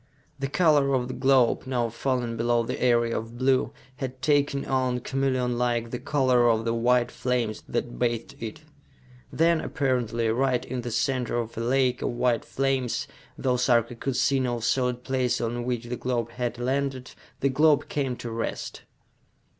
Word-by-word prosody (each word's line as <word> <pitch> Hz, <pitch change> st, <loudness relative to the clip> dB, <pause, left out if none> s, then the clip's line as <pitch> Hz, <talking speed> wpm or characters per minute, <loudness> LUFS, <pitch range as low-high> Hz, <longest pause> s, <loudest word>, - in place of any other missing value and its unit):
The 135 Hz, -, -1 dB
color 145 Hz, -3 st, +3 dB
of 125 Hz, -1 st, -1 dB
the -, -, -3 dB
globe, 130 Hz, -2 st, +3 dB
now 120 Hz, -3 st, 0 dB
fallen 120 Hz, 0 st, -2 dB
below 120 Hz, +1 st, +1 dB
the -, -, -4 dB
area 120 Hz, -2 st, +3 dB
of 115 Hz, +2 st, -5 dB
blue, 130 Hz, +1 st, +2 dB, 0.3 s
had 130 Hz, -1 st, -5 dB
taken 145 Hz, -1 st, +1 dB
on, 130 Hz, -2 st, 0 dB
chameleonlike, 125 Hz, -3 st, 0 dB
the 125 Hz, -, -3 dB
color 130 Hz, -4 st, +3 dB
of 115 Hz, 0 st, +1 dB
the 115 Hz, -, +1 dB
white 120 Hz, +1 st, +2 dB
flames 120 Hz, -4 st, -1 dB
that 120 Hz, -, -3 dB
bathed 120 Hz, -2 st, -1 dB
it. 115 Hz, +5 st, -6 dB, 0.7 s
Then, 165 Hz, 0 st, +3 dB
apparently 120 Hz, -4 st, 0 dB
right 125 Hz, +2 st, +1 dB
in 125 Hz, 0 st, -4 dB
the 120 Hz, -, -5 dB
center 125 Hz, +1 st, 0 dB
of 115 Hz, -1 st, -3 dB
a 115 Hz, -, -3 dB
lake 125 Hz, +1 st, +1 dB
of -, -, 0 dB
white 120 Hz, -1 st, +1 dB
flames, 135 Hz, -3 st, -1 dB, 0.3 s
though 125 Hz, -1 st, +1 dB
Sarka 120 Hz, -2 st, +2 dB
could 125 Hz, +2 st, -3 dB
see 135 Hz, +1 st, +2 dB
no 120 Hz, -2 st, -1 dB
solid 125 Hz, +1 st, 0 dB
place 125 Hz, -2 st, 0 dB
on 120 Hz, +1 st, -2 dB
which 125 Hz, -2 st, -2 dB
the 120 Hz, +1 st, -4 dB
globe 120 Hz, -2 st, -2 dB
had 120 Hz, -1 st, -3 dB
landed, 130 Hz, +1 st, -2 dB, 0.3 s
the 140 Hz, -, +3 dB
globe 150 Hz, +2 st, +3 dB
came 135 Hz, -4 st, -2 dB
to 120 Hz, -1 st, -7 dB
rest. 115 Hz, 0 st, -4 dB
125 Hz, 170 wpm, -26 LUFS, 120-130 Hz, 0.7 s, color